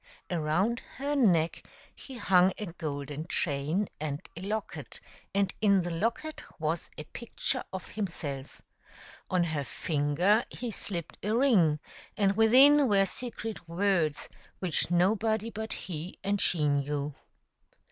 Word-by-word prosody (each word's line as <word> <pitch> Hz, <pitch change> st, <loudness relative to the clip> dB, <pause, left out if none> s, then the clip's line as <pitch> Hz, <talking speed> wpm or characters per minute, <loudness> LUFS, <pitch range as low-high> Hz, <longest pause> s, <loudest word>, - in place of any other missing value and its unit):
Around 175 Hz, +8 st, +1 dB, 0.2 s
her 285 Hz, +2 st, -1 dB
neck 175 Hz, -, +3 dB, 0.3 s
he 265 Hz, -2 st, -10 dB
hung 185 Hz, -3 st, +4 dB
a 210 Hz, -, -4 dB
golden 150 Hz, -3 st, -5 dB
chain 155 Hz, +6 st, 0 dB
and 145 Hz, -2 st, -3 dB, 0.2 s
a 170 Hz, -, -7 dB
locket, 210 Hz, +2 st, -4 dB, 0.3 s
and 200 Hz, -1 st, +1 dB
in 200 Hz, -3 st, +5 dB
the 175 Hz, 0 st, -3 dB
locket 230 Hz, -, -2 dB, 0.2 s
was 160 Hz, +1 st, -1 dB
a 155 Hz, -, -5 dB
picture 240 Hz, -, -2 dB
of 190 Hz, -1 st, -6 dB
himself; 150 Hz, -9 st, -5 dB, 0.7 s
on 180 Hz, -1 st, +2 dB
her 155 Hz, -4 st, -1 dB
finger 160 Hz, -, +1 dB
he 245 Hz, -2 st, -5 dB
slipped 175 Hz, -5 st, -5 dB
a 215 Hz, +2 st, 0 dB
ring, 190 Hz, -, +4 dB, 0.4 s
and 200 Hz, -2 st, +3 dB
within 265 Hz, +6 st, +7 dB
were 195 Hz, -1 st, +4 dB
secret 225 Hz, -4 st, -5 dB
words 170 Hz, -4 st, +1 dB, 0.3 s
which 180 Hz, -4 st, +1 dB
nobody 215 Hz, +5 st, +2 dB
but 220 Hz, +1 st, -5 dB
he 175 Hz, 0 st, -5 dB
and 200 Hz, 0 st, +1 dB
she 155 Hz, -4 st, +3 dB
knew. 145 Hz, 0 st, 0 dB
185 Hz, 130 wpm, -29 LUFS, 155-220 Hz, 0.7 s, within